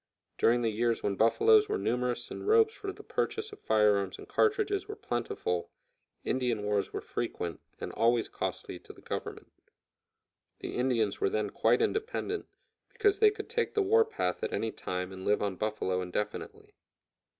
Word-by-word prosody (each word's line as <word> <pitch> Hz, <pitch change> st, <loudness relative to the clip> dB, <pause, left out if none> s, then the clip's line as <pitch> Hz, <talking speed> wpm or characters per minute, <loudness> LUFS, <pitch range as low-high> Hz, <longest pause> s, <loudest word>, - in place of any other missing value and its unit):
During 120 Hz, +1 st, +4 dB
the 115 Hz, -, +2 dB
years 115 Hz, +2 st, 0 dB
when 100 Hz, -, +1 dB
buffaloes 425 Hz, -, +5 dB
were 425 Hz, -, +1 dB
numerous 125 Hz, -, -1 dB
and -, -, -6 dB
robes 445 Hz, 0 st, +5 dB
for 400 Hz, -4 st, -5 dB
the -, -, -12 dB
purchase 435 Hz, 0 st, -2 dB
of 420 Hz, -, -11 dB
fire 105 Hz, -2 st, +4 dB
arms 95 Hz, -2 st, -3 dB
and -, -, -11 dB
cartridges 415 Hz, -2 st, +1 dB
were 425 Hz, -, -5 dB
plentiful, 90 Hz, -, -2 dB, 0.5 s
Indian 125 Hz, -5 st, 0 dB
wars 105 Hz, -1 st, 0 dB
were -, -, -4 dB
frequent, 85 Hz, -1 st, -4 dB, 0.2 s
and -, -, -5 dB
always 115 Hz, 0 st, +2 dB
costly -, -, -4 dB
to -, -, -13 dB
the -, -, -17 dB
Government. -, -, -5 dB, 1.1 s
The -, -, -5 dB
Indians 120 Hz, -5 st, +1 dB
were -, -, +3 dB
then 105 Hz, -1 st, -1 dB
quite 115 Hz, +2 st, +3 dB
independent, 435 Hz, -1 st, -2 dB, 0.4 s
because 410 Hz, -1 st, +2 dB
they 430 Hz, -, +7 dB
could 420 Hz, -, -6 dB
take 465 Hz, 0 st, -1 dB
the 415 Hz, -, +3 dB
war 450 Hz, +4 st, +5 dB
path 445 Hz, +1 st, -2 dB
at 460 Hz, -, -1 dB
any 115 Hz, -, -1 dB
time 90 Hz, -2 st, -4 dB
and 95 Hz, 0 st, -8 dB
live 105 Hz, +1 st, +2 dB
on 100 Hz, -2 st, -1 dB
buffalo 105 Hz, -3 st, -1 dB
indefinitely. 90 Hz, +3 st, -4 dB
120 Hz, 170 wpm, -30 LUFS, -, 1.1 s, they